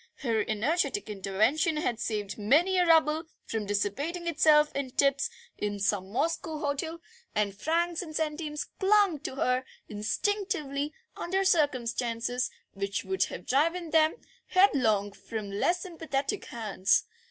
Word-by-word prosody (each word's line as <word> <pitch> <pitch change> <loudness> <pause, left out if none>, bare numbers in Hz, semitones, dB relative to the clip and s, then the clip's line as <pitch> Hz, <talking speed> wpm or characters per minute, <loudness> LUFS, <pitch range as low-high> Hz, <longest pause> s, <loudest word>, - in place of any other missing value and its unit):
Her 225 -6 +1
energetic 300 - 0
intervention 215 - +1
had 245 -7 -1
saved 210 -3 -2
many 325 - +3
a 355 - +3
rouble 320 -1 +4 0.2
from 220 -2 -3
dissipating 275 - -1
itself 305 -2 +4
in 275 -2 -2
tips 275 +2 +2 0.3
in 205 -1 -2
some 195 -1 0
Moscow 320 - -1
hotel, 300 +3 -2 0.4
and 205 -2 0
francs 335 - 0
and 315 -4 -8
centimes 300 -1 -2
clung 390 -5 +4
to 265 - -5
her 255 -1 +1 0.2
instinctively 290 - -1 0.2
under 380 +3 -1
circumstances 245 -6 +1 0.2
which 200 0 -3
would 380 0 +1
have - - -8
driven 330 +5 +1
them 315 0 +4 0.3
headlong 230 - +3
from 200 +1 -6
less 345 - +1
sympathetic 320 0 -3
hands. 210 -5 +1
285 Hz, 130 wpm, -29 LUFS, 220-330 Hz, 0.4 s, rouble